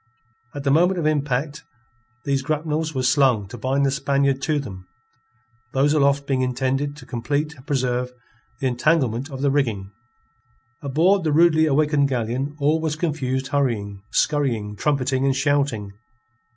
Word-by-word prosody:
At 140 Hz, -, -5 dB
the 140 Hz, -, +1 dB
moment 175 Hz, +5 st, +3 dB
of 160 Hz, -, -2 dB
impact 145 Hz, -1 st, -1 dB, 0.6 s
these 140 Hz, -1 st, +1 dB
grapnels 155 Hz, +2 st, -2 dB
were 130 Hz, -, -1 dB
slung 125 Hz, -6 st, +3 dB
to -, -, -8 dB
bind 135 Hz, +2 st, +1 dB
the 135 Hz, -, +2 dB
Spaniard 140 Hz, -1 st, +1 dB
to 155 Hz, +1 st, 0 dB
them, 95 Hz, -10 st, -7 dB, 0.9 s
those 140 Hz, +3 st, +3 dB
aloft 140 Hz, -1 st, +2 dB
being 135 Hz, -2 st, 0 dB
intended 135 Hz, +3 st, -1 dB
to 130 Hz, -, -12 dB
complete 145 Hz, +6 st, -2 dB
and 135 Hz, -1 st, -18 dB
preserve 125 Hz, -3 st, -1 dB, 0.5 s
the 135 Hz, -, -3 dB
entanglement 130 Hz, 0 st, +1 dB
of 135 Hz, -1 st, -6 dB
the 140 Hz, -, +3 dB
rigging. 110 Hz, -9 st, -1 dB, 0.9 s
Aboard 165 Hz, +8 st, +2 dB
the 155 Hz, -, 0 dB
rudely 160 Hz, 0 st, +4 dB
awakened 150 Hz, -1 st, +2 dB
galleon 130 Hz, +3 st, -2 dB
all 150 Hz, +3 st, +2 dB
was 155 Hz, -2 st, -1 dB
confused 135 Hz, -5 st, -2 dB
hurrying, 110 Hz, -8 st, -1 dB
scurrying, 120 Hz, -9 st, 0 dB
trumpeting, 135 Hz, +1 st, 0 dB
and 135 Hz, -1 st, +2 dB
shouting. 135 Hz, -7 st, 0 dB
140 Hz, 150 wpm, -22 LUFS, 130-150 Hz, 0.9 s, rudely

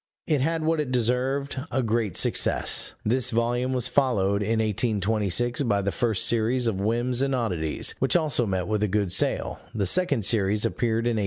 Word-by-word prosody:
It 150 Hz, -5 st, 0 dB
had 160 Hz, +3 st, -1 dB
what 160 Hz, 0 st, 0 dB
it 145 Hz, -4 st, -2 dB
deserved, 130 Hz, +3 st, -1 dB
a 130 Hz, +1 st, -1 dB
great 110 Hz, -4 st, -1 dB
success. -, -, +1 dB
This 125 Hz, +4 st, +1 dB
volume 120 Hz, +2 st, -1 dB
was 125 Hz, -3 st, -1 dB
followed, 100 Hz, -8 st, +1 dB
in 110 Hz, +2 st, 0 dB
1826, 110 Hz, +2 st, 0 dB
by 100 Hz, -7 st, 0 dB
the 100 Hz, -, -1 dB
first 110 Hz, -4 st, +1 dB
series 120 Hz, +2 st, +1 dB
of 100 Hz, -4 st, -1 dB
Whims 120 Hz, +4 st, 0 dB
and 135 Hz, -1 st, 0 dB
Oddities, 90 Hz, -11 st, -1 dB
which 135 Hz, -1 st, +1 dB
also 150 Hz, -8 st, +1 dB
met 95 Hz, -2 st, -2 dB
with 105 Hz, -1 st, -1 dB
a 105 Hz, -, +1 dB
good 100 Hz, -2 st, -1 dB
sale; -, -, 0 dB, 0.2 s
the 100 Hz, -3 st, 0 dB
second 140 Hz, -, +2 dB
series 105 Hz, 0 st, +1 dB
appeared 115 Hz, 0 st, -1 dB
in 120 Hz, -2 st, 0 dB
1827. -, -, 0 dB
115 Hz, 185 wpm, -25 LUFS, 105-130 Hz, 0.2 s, second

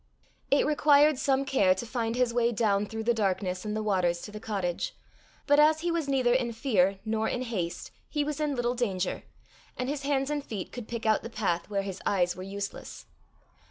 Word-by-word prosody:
It 280 Hz, -, +4 dB
required 295 Hz, -1 st, +4 dB
some 275 Hz, -1 st, +1 dB
care 200 Hz, -9 st, +3 dB
to 215 Hz, -, -5 dB
find 230 Hz, -1 st, -2 dB
his 250 Hz, -1 st, +1 dB
way 240 Hz, 0 st, +2 dB
down 210 Hz, -3 st, +1 dB
through 220 Hz, +1 st, -5 dB
the 235 Hz, +1 st, +3 dB
darkness 190 Hz, -4 st, -1 dB
and 210 Hz, 0 st, -3 dB
the 215 Hz, -, -2 dB
waters 180 Hz, -4 st, +1 dB
to 210 Hz, -, -8 dB
the 210 Hz, -, -7 dB
cottage, 195 Hz, -5 st, -3 dB, 0.5 s
but 290 Hz, 0 st, +4 dB
as 310 Hz, +1 st, +5 dB
he 345 Hz, 0 st, 0 dB
was 335 Hz, -3 st, -1 dB
neither 260 Hz, -3 st, +2 dB
in 245 Hz, -2 st, 0 dB
fear 200 Hz, -6 st, +2 dB
nor 220 Hz, 0 st, 0 dB
in 250 Hz, -, -2 dB
haste, 185 Hz, -9 st, -4 dB, 0.2 s
he 295 Hz, -1 st, 0 dB
was 300 Hz, 0 st, -3 dB
in 300 Hz, -2 st, 0 dB
little 245 Hz, -1 st, 0 dB
danger, 195 Hz, -7 st, -1 dB, 0.6 s
and 255 Hz, -, -2 dB
his 285 Hz, 0 st, -2 dB
hands 275 Hz, 0 st, 0 dB
and 295 Hz, -1 st, -2 dB
feet 205 Hz, -8 st, -6 dB
could 245 Hz, -3 st, -7 dB
pick 235 Hz, -1 st, -5 dB
out 220 Hz, -1 st, +3 dB
the -, -, -7 dB
path 195 Hz, -7 st, -1 dB
where 200 Hz, -1 st, -1 dB
his 195 Hz, -2 st, -6 dB
eyes 180 Hz, -3 st, +1 dB
were 185 Hz, -, -8 dB
useless. 200 Hz, +1 st, -6 dB
230 Hz, 210 wpm, -28 LUFS, 200-270 Hz, 0.6 s, as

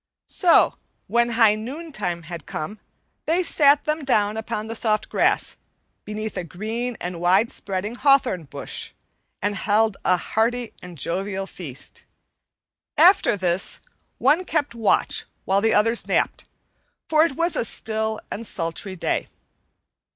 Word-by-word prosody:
So 355 Hz, -3 st, +4 dB, 0.3 s
when 235 Hz, 0 st, +2 dB
high 225 Hz, -2 st, +5 dB
noontide 215 Hz, -, -5 dB
had 170 Hz, -3 st, -8 dB
come 200 Hz, +8 st, -5 dB, 0.5 s
they 340 Hz, +4 st, +2 dB
sat 290 Hz, -3 st, +4 dB
them 305 Hz, 0 st, -1 dB
down 210 Hz, -6 st, +2 dB
upon 215 Hz, -1 st, -3 dB
the 225 Hz, -, -5 dB
soft 215 Hz, -2 st, 0 dB
grass, -, -, +1 dB, 0.5 s
beneath 215 Hz, +1 st, -5 dB
a 180 Hz, -, -2 dB
green 220 Hz, +7 st, -4 dB
and 175 Hz, -1 st, -5 dB
wide 185 Hz, +6 st, +3 dB
spreading 195 Hz, +2 st, -2 dB
hawthorn 250 Hz, -, +3 dB
bush, -, -, -5 dB, 0.5 s
and 205 Hz, +1 st, +1 dB
held 210 Hz, +1 st, +2 dB
a 180 Hz, -, +3 dB
hearty 230 Hz, +5 st, -1 dB
and 180 Hz, -2 st, -10 dB
jovial 190 Hz, +6 st, -3 dB
feast. 150 Hz, -8 st, -9 dB, 0.9 s
After 350 Hz, -, +6 dB
this, 180 Hz, -1 st, 0 dB, 0.4 s
one 300 Hz, +8 st, +3 dB
kept 300 Hz, -7 st, -1 dB
watch 225 Hz, -3 st, +1 dB, 0.2 s
while 195 Hz, +1 st, +2 dB
the 225 Hz, -, +3 dB
others 225 Hz, +3 st, +2 dB
napped, -, -, 0 dB, 0.6 s
for 310 Hz, 0 st, +5 dB
it 330 Hz, -4 st, +1 dB
was 335 Hz, +4 st, 0 dB
a -, -, +1 dB
still 220 Hz, -1 st, -1 dB
and 225 Hz, +1 st, -4 dB
sultry 170 Hz, +2 st, -3 dB
day. 175 Hz, -, -1 dB
215 Hz, 135 wpm, -23 LUFS, 190-245 Hz, 0.9 s, After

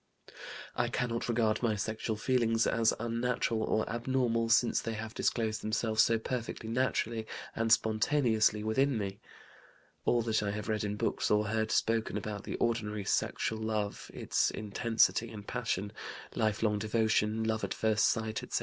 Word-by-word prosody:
"I -, -, +1 dB
cannot 120 Hz, -1 st, -2 dB
regard 110 Hz, -2 st, +1 dB
my 115 Hz, -3 st, +1 dB
sexual 110 Hz, +2 st, -2 dB
feelings 115 Hz, 0 st, +2 dB
as 115 Hz, -1 st, +3 dB
unnatural 115 Hz, 0 st, -1 dB
or 110 Hz, 0 st, 0 dB
abnormal, 120 Hz, -1 st, 0 dB
since 120 Hz, +1 st, +3 dB
they 115 Hz, -, -3 dB
have 110 Hz, +1 st, -6 dB
disclosed 110 Hz, -2 st, 0 dB
themselves 110 Hz, 0 st, +1 dB
so 115 Hz, 0 st, +3 dB
perfectly 115 Hz, -1 st, -4 dB
naturally 115 Hz, -2 st, 0 dB, 0.3 s
and 115 Hz, 0 st, 0 dB
spontaneously 110 Hz, -1 st, +3 dB
within 130 Hz, +4 st, +2 dB
me. 100 Hz, -1 st, -4 dB, 0.8 s
All 120 Hz, -1 st, +2 dB
that 110 Hz, -2 st, +1 dB
I 105 Hz, -, -1 dB
have 105 Hz, 0 st, -4 dB
read 110 Hz, -1 st, 0 dB
in 105 Hz, 0 st, -2 dB
books -, -, -1 dB
or 105 Hz, 0 st, +3 dB
heard 110 Hz, 0 st, 0 dB
spoken 115 Hz, 0 st, +1 dB
about 105 Hz, -2 st, -5 dB
the -, -, -4 dB
ordinary 105 Hz, -3 st, -1 dB
sexual 110 Hz, +2 st, 0 dB
love, 110 Hz, -2 st, -3 dB
its -, -, 0 dB
intensity 115 Hz, +2 st, +1 dB
and 105 Hz, -3 st, -9 dB
passion, 105 Hz, -4 st, -2 dB, 0.4 s
lifelong 110 Hz, -1 st, +1 dB
devotion, 110 Hz, 0 st, +1 dB
love 110 Hz, 0 st, -1 dB
at -, -, -2 dB
first 110 Hz, -1 st, +2 dB
sight, 110 Hz, -1 st, -1 dB
etc. -, -, -2 dB
110 Hz, 155 wpm, -31 LUFS, 110-115 Hz, 0.8 s, as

